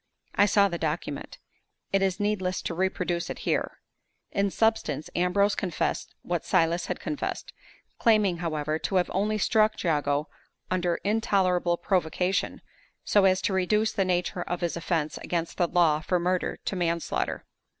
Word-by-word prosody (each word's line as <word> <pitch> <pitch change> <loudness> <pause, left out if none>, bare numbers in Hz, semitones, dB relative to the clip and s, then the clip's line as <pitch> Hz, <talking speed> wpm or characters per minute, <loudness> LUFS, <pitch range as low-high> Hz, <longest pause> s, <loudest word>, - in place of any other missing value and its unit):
I 205 - +4
saw 200 0 +4
the 170 -3 -4
document. 155 -2 -3 0.6
It 195 - +3
is 190 0 +1
needless 200 -3 -1
to - - -3
reproduce 180 -1 -1
it - - -4
here. - - 0 0.5
In 200 0 +1
substance, 210 -9 0
Ambrose 200 +3 +2
confessed 180 -4 -2
what 175 -2 -2
Silas 170 +1 +1
had - - -3
confessed; 295 - -4 0.5
claiming, 210 -6 +3
however, 155 -2 -2
to 195 - -3
have 180 -1 +2
only 210 +3 +1
struck 215 +1 +2
Jago 150 -3 +1 0.4
under 180 -2 +1
intolerable 190 -5 +2
provocation, 180 0 0 0.4
so 205 -2 +4
as 185 0 +3
to 195 - +1
reduce 210 +4 +2
the 200 - +1
nature 180 -1 -1
of 175 +1 -3
his 170 -1 -1
offense 165 -2 -1
against 170 -1 -3
the 175 - +2
law 165 -3 +3
from 175 +2 0
murder 180 0 0
to - - -2
manslaughter. 170 -2 -1
180 Hz, 150 wpm, -27 LUFS, 170-200 Hz, 0.6 s, I